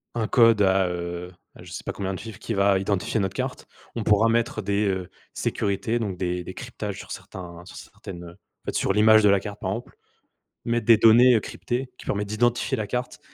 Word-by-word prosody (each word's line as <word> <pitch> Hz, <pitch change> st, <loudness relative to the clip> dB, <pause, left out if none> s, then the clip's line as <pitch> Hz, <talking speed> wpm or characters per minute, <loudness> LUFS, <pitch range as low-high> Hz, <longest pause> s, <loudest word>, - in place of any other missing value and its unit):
un 110 Hz, -2 st, -1 dB
code 115 Hz, -4 st, +5 dB
à, 95 Hz, -1 st, +3 dB
heu, 85 Hz, 0 st, -5 dB, 0.2 s
à -, -, -13 dB
je -, -, -12 dB
sais -, -, -6 dB
pas -, -, -2 dB
combien 95 Hz, -1 st, -3 dB
de -, -, -6 dB
chiffres 110 Hz, -4 st, -9 dB
qui 115 Hz, -, -4 dB
va 100 Hz, -1 st, +3 dB
identifier 100 Hz, +3 st, -1 dB
notre 95 Hz, -, -2 dB
carte. -, -, -4 dB, 0.3 s
On 115 Hz, -, -2 dB
pourra 105 Hz, +2 st, +4 dB
mettre 115 Hz, -1 st, 0 dB
des, 100 Hz, +1 st, 0 dB
heu, 95 Hz, -2 st, -2 dB, 0.2 s
sécurités, 105 Hz, +4 st, -1 dB
donc 100 Hz, -5 st, -3 dB
des 90 Hz, -1 st, -2 dB
des 95 Hz, -, -8 dB
cryptages 110 Hz, -5 st, -6 dB
sur -, -, -10 dB
certains 85 Hz, -2 st, -9 dB
sur -, -, -12 dB
certaines, 85 Hz, -2 st, -10 dB
heu, 85 Hz, -, -10 dB
en 95 Hz, -, -26 dB
fait, -, -, -3 dB
sur 95 Hz, -, +1 dB
l'image 110 Hz, +1 st, +6 dB
de 105 Hz, -, +6 dB
la 100 Hz, 0 st, +4 dB
carte, 105 Hz, +1 st, -8 dB
par 95 Hz, -, -2 dB
exemple, 115 Hz, +4 st, -6 dB, 0.7 s
mettre 120 Hz, 0 st, 0 dB
des 115 Hz, -2 st, +7 dB
données, 120 Hz, +3 st, +7 dB
heu, -, -, +4 dB
cryptées 125 Hz, +4 st, -4 dB
qui -, -, -13 dB
permettent 105 Hz, 0 st, -2 dB
d'identifier 120 Hz, +5 st, +1 dB
la 110 Hz, -, -2 dB
carte 125 Hz, 0 st, -4 dB
105 Hz, 225 wpm, -25 LUFS, 95-115 Hz, 0.7 s, des